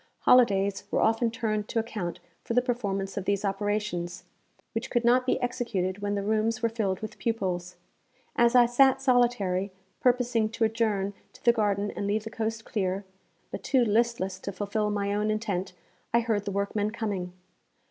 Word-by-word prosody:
Holidays 200 -6 +4
were - - 0
often 225 +1 +2
turned 215 -2 -2
to - - -4
account 215 -6 -3 0.2
for 230 - -3
the 250 - +5
performance 200 -6 -2
of 195 - -2
these 200 0 0
operations, 195 -3 -2 0.5
which 225 - -3
could 240 -1 0
not 250 +2 +4
be - - +2
executed 215 -7 -1
when 205 0 -1
the 200 - -2
rooms 220 +2 0
were 230 - +3
filled 205 -5 -2
with 215 - -7
pupils. 185 -6 -2 0.6
As 235 +1 +4
I 245 -1 +8
sat 265 +2 +4
solitary, 240 -8 +2 0.3
purposing 245 -3 +2
to 225 - 0
adjourn 215 -3 +1 0.2
to - - -19
the 235 - +7
garden 205 -2 0
and 200 - -4
leave 210 +1 0
the 220 - -7
coast 225 0 -3
clear, 195 -1 -2 0.5
but - - -5
too 265 -3 +2
listless 215 -4 +1
to 200 - -5
fulfil 210 +2 -1
my 200 -1 -1
own 210 +1 0
intent, 200 -4 -2 0.4
I 235 - +5
heard 220 -3 -1
the 200 - -2
workmen 200 +1 -1
coming. 200 -5 -3
215 Hz, 175 wpm, -28 LUFS, 200-235 Hz, 0.6 s, I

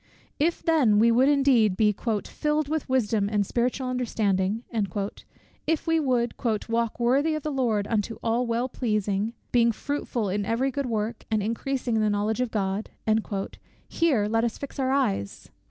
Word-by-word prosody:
If 330 +4 +1
then 280 -11 +4
we 230 +2 +5
would 255 +4 +4
indeed 260 -9 +3
be 210 -2 +3 0.3
"filled 300 -1 -1
with 310 -2 -2
wisdom 220 -5 +1
and 205 -1 +1
spiritual 250 +4 -1
understanding;" 220 -4 0 1.0
if 320 -1 0
we 325 -1 +2
would 250 -5 +1 0.3
"walk 230 0 -1
worthy 275 +6 +2
of 310 - -4
the 305 - -2
Lord 235 -7 0
unto 225 0 -1
all 235 +2 +1
well 235 +2 0
pleasing, 215 -3 -1 0.2
being 235 -1 +4
fruitful 245 -3 -3
in 200 +2 -1
every 230 +6 0
good 280 0 -2
work, 220 0 -3
and 215 -2 +1
increasing 235 +2 -1
in - - +2
the 215 - +2
knowledge 210 +3 0
of 250 - 0
God;" 200 -1 -2 1.0
here 280 -11 +2
let 225 +1 +1
us 235 -1 -1
fix 280 0 -8
our 260 -1 +1
eyes! 215 - -1
235 Hz, 165 wpm, -26 LUFS, 215-270 Hz, 1.0 s, we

